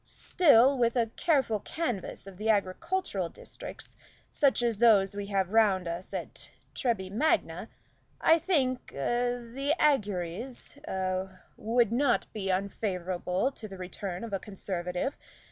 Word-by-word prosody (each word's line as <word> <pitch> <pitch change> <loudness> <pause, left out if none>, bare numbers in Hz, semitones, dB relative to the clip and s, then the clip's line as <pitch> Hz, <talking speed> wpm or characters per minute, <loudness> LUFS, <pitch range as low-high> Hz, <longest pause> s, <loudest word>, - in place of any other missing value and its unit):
Still, 275 -6 +4
with 235 0 +2
a 230 -2 +1
careful 270 -10 +2
canvass 240 - -4
of 195 -2 -11
the 215 +3 -2
agricultural 205 - 0
districts, - - -10 0.4
such 275 -4 +2
as 230 -3 0
those 205 -5 +5
we 200 0 -5
have 195 -2 0
round 200 -5 +3
us 170 +2 -5
at - - -6 0.2
Treby 200 -7 -1
Magna, 290 +10 0 0.5
I 325 +1 +5
think 270 -8 0
a 245 - 0
the 265 +5 -2
auguries 220 - -1
a 185 0 -2 0.2
would 230 0 +1
not 250 +1 +2
be 195 -3 -2
unfavorable 185 +2 -1
to 225 -5 -9
the 195 -2 -9
return 185 +1 -5
of 225 -3 -6
a 195 - 0
Conservative. 185 +3 -3
215 Hz, 135 wpm, -29 LUFS, 190-250 Hz, 0.5 s, those